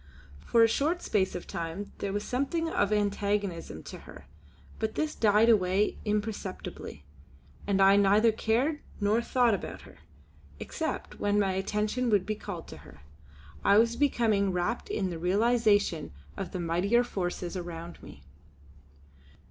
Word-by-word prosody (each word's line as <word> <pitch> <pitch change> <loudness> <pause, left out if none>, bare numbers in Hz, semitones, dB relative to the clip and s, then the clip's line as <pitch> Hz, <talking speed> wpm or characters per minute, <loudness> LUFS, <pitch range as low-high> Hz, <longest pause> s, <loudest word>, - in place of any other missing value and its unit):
For 230 - +4
a - - +7
short 315 +9 0
space 195 -3 0
of 180 - -5
time 170 +4 -5
there 200 - -2
was 205 +1 -2
something 280 +6 -1
of 205 -10 0
antagonism 205 -3 -1
to - - -9
her; - - -13 0.5
but 220 0 -2
this 310 0 -1
died 215 +1 +4
away 200 -2 +2
imperceptibly, 210 - -4 0.6
and 200 -1 +1
I 195 +1 +6
neither 205 +3 +5
cared 245 +8 0 0.2
nor 210 +3 +2
thought 240 -1 +2
about 195 - -5
her, - - -16 0.6
except - - -4
when 205 0 +1
my 195 -2 +2
attention 210 +6 -1
would 205 -4 +3
be 215 - -1
called 200 -5 -7
to - - -9
her. 75 - -15 0.6
I 200 - +5
was 230 +1 +4
becoming 225 -8 +2
wrapped 185 +7 -2
in 190 -3 -1
the 165 - -5
realisation 205 - +2 0.2
of - - -5
the 185 - -4
mightier 180 +8 +2
forces 180 -5 -4
around 170 -1 -7
me. 70 - -13
205 Hz, 150 wpm, -29 LUFS, 185-230 Hz, 0.6 s, a